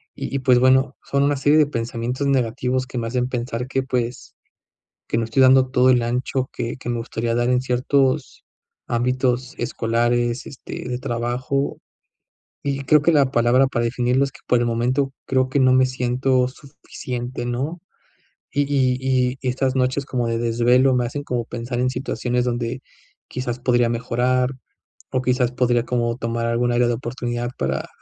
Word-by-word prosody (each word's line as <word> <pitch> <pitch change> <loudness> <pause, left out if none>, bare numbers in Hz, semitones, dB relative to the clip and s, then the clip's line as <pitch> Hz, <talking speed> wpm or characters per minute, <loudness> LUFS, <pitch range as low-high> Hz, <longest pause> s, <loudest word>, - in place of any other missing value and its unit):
Y - - -5
y, - - +1
pues, 125 -2 +4
bueno, 130 +1 +3
son 140 0 0
una 145 +1 +2
serie 145 +2 +3
de 155 - +6
pensamientos 120 +1 -3
negativos 130 0 0
que 130 - -7
me 115 -1 -2
hacen 125 +1 -1
pensar 125 -1 -3
que, 135 0 -1
pues, 125 -2 -3 0.7
que - - 0
no 115 - 0
estoy 115 +4 +2
dando 130 0 +6
todo 130 0 +4
el 125 -2 +4
ancho 125 +2 -1
que 115 - -3
que 125 - -8
me 120 -1 -1
gustaría 115 0 -2
dar 120 +1 +1
en 125 0 +3
ciertos 130 +2 0 0.4
ámbitos 125 +1 0
escolares, 120 +1 0
este, 130 - -8
de 125 0 -2
trabajo. 125 +3 -2 0.9
Y 140 -1 -1
creo 150 +2 +5
que 170 - +3
la 140 -4 +4
palabra 125 +1 +3
para 120 -3 -1
definirlo 125 +2 +1
es 140 - -2
que, - - -16
por 125 - +3
el 120 - +1
momento, 125 +4 0
creo 130 -1 +1
que 140 - +1
no 130 -1 +5
me 130 0 +5
siento 130 0 +1
suficiente, 125 -2 -7
¿no? 135 +8 -3 0.7
Y 145 +3 +2
y 135 -3 +1
y 130 -1 +1
y 130 - -2
estas 130 +1 0
noches 130 +1 0
como 125 -3 -2
de 115 0 -1
desvelo 120 +3 +3
me 125 -1 +1
hacen 145 +4 -4
como 120 -3 -2
pensar 120 +1 -4
en 125 - +2
situaciones 125 -1 -2
donde, 120 +1 -2 0.5
quizás, 125 -1 -4
podría 120 -1 +2
mejorar, 125 +2 0 0.6
o 130 - 0
quizás 125 -1 +1
podría 120 -1 +1
como 120 -1 0
tomar 115 -1 -2
algún 120 +1 +1
área 120 0 +3
de - - +2
oportunidad 120 0 -3
para - - -2
125 Hz, 180 wpm, -22 LUFS, 120-130 Hz, 0.9 s, de